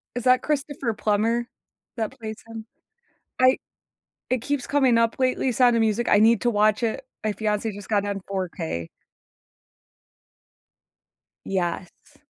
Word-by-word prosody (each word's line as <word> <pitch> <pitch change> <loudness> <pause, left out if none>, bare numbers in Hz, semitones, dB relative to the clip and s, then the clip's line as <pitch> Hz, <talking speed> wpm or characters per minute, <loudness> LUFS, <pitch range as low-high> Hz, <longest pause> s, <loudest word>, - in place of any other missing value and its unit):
Is 245 0 -3
that 255 0 +4
Christopher 285 -4 -1
Plummer 225 +3 +1 0.5
that 220 -2 -4
plays 220 -1 -6
him? 225 -1 -9 0.8
I 255 +1 +6 0.7
it 255 -2 0
keeps 285 -1 -2
coming 265 -5 +3
up 230 0 +2
lately, 255 0 +1
Sound 245 0 +4
of - - +2
Music. 220 +2 +1
I 205 - +5
need 225 0 +5
to 240 - +2
watch 215 +1 +2
it. 230 +3 -2 0.2
My 215 - 0
fiance 210 +1 -1
just 200 -1 -10
got 205 -2 +2
it - - -4
on 195 -1 -3
4K. 125 - -4 2.6
Yes. 180 -1 -4
225 Hz, 140 wpm, -24 LUFS, 205-250 Hz, 2.6 s, I